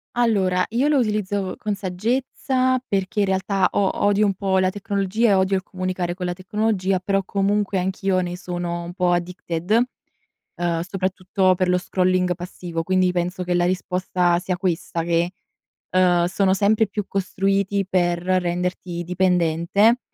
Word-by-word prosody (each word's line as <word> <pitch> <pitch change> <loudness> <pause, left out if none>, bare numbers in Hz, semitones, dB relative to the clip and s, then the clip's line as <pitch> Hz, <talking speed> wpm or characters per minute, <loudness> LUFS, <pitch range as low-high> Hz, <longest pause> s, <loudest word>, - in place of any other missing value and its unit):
Allora 195 -6 +2
io 245 +6 +1
lo 300 -2 +3
utilizzo 205 -4 -1
con 210 -1 -2
saggezza 255 +6 0
perché 195 +1 -1
in 200 - +4
realtà 190 0 +1
o 195 -2 +2
odio 205 +1 +3
un 200 - +1
po' 190 0 0
la 185 0 +2
tecnologia 200 +3 0
e 200 - +5
odio 190 0 +2
il - - -3
comunicare 185 -1 -3
con 180 -1 -4
la 180 - -1
tecnologia. 195 0 0
Però 195 +1 0
comunque 200 +1 0
anch'io 190 0 0
ne 175 0 -3
sono 175 -2 -4
un 175 +1 -7
po' 180 -1 +1
addicted 175 0 -3 0.8
ehm, 170 -1 -1
soprattutto 185 0 0
per 185 0 0
lo 180 - +3
scrolling 180 0 +1
passivo. 175 -2 -5
Quindi 185 0 +2
penso 180 +1 -2
che 180 - -1
la 175 0 +2
risposta 180 -1 0
sia 180 0 -2
questa 170 -2 -2
che, 170 +1 +1 0.6
uhm, 180 -2 +3
sono 190 +1 +2
sempre 210 +3 +3
più 205 +1 -4
costruiti 195 +1 0
per 175 -2 +1
renderti 180 -1 -1
dipendente 180 +5 +2
185 Hz, 155 wpm, -22 LUFS, 180-200 Hz, 0.8 s, e